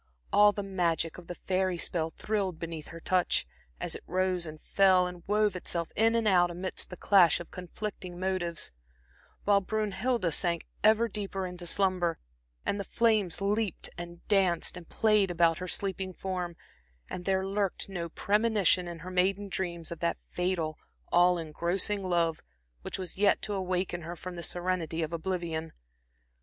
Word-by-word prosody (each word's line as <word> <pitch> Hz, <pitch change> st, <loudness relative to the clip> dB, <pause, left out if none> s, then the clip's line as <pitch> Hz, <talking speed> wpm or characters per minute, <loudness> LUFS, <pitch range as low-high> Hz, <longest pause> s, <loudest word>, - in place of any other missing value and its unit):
All 205 Hz, 0 st, +7 dB
the 205 Hz, 0 st, -4 dB
magic 175 Hz, -4 st, 0 dB
of 175 Hz, -, -14 dB
the 175 Hz, -, -5 dB
fairy 185 Hz, -1 st, 0 dB
spell 165 Hz, -1 st, 0 dB
thrilled 200 Hz, -5 st, -1 dB
beneath 165 Hz, -2 st, -6 dB
her 165 Hz, -, -9 dB
touch, 180 Hz, +1 st, +1 dB, 0.3 s
as -, -, -2 dB
it -, -, -6 dB
rose 185 Hz, -2 st, 0 dB
and 155 Hz, 0 st, -8 dB
fell 185 Hz, 0 st, +4 dB
and 180 Hz, -1 st, -6 dB
wove 210 Hz, -1 st, +2 dB
itself 170 Hz, -2 st, -2 dB
in 225 Hz, +1 st, +4 dB
and 230 Hz, -2 st, +2 dB
out 175 Hz, -3 st, +5 dB
amidst 180 Hz, +2 st, -2 dB
the 180 Hz, -, -8 dB
clash 185 Hz, -6 st, +5 dB
of 175 Hz, -, -9 dB
conflicting 180 Hz, 0 st, -6 dB
motives, 185 Hz, -3 st, -1 dB, 0.7 s
while 200 Hz, -1 st, +4 dB
Brünnhilde 215 Hz, -1 st, 0 dB
sank 170 Hz, -1 st, 0 dB, 0.2 s
ever 220 Hz, +2 st, +5 dB
deeper 195 Hz, -3 st, -3 dB
into 180 Hz, -1 st, -5 dB
slumber, 180 Hz, -3 st, +2 dB, 0.5 s
and 205 Hz, -, 0 dB
the -, -, -1 dB
flames 215 Hz, -6 st, +2 dB
leaped 205 Hz, -1 st, -1 dB
and 175 Hz, 0 st, -9 dB
danced 190 Hz, -5 st, +2 dB
and 175 Hz, -2 st, -10 dB
played 215 Hz, -3 st, +3 dB
about 165 Hz, -2 st, +3 dB
her 180 Hz, -, -4 dB
sleeping 190 Hz, -1 st, -1 dB
form, 180 Hz, -2 st, -4 dB, 0.5 s
and 180 Hz, -, -6 dB
there 190 Hz, -1 st, +1 dB
lurked 195 Hz, -1 st, -1 dB
no 175 Hz, -4 st, -4 dB
premonition 205 Hz, -2 st, +2 dB
in 170 Hz, -1 st, -6 dB
her 185 Hz, -, -6 dB
maiden 195 Hz, +2 st, +1 dB
dreams 170 Hz, -4 st, -3 dB
of 170 Hz, -, -5 dB
that 170 Hz, 0 st, 0 dB
fatal, 180 Hz, -4 st, -1 dB, 0.3 s
all 175 Hz, +1 st, +5 dB
engrossing 175 Hz, +5 st, -1 dB
love, 170 Hz, -3 st, +1 dB, 0.4 s
which -, -, -4 dB
was 185 Hz, -1 st, -5 dB
yet 205 Hz, -1 st, +4 dB
to 210 Hz, -1 st, -2 dB
awaken 185 Hz, -2 st, -1 dB
her 170 Hz, +2 st, -6 dB
from 180 Hz, +2 st, -7 dB
the 170 Hz, -, -5 dB
serenity 175 Hz, -2 st, -1 dB
of 160 Hz, +1 st, -4 dB
oblivion. 165 Hz, -2 st, -3 dB
185 Hz, 165 wpm, -30 LUFS, 170-195 Hz, 0.7 s, All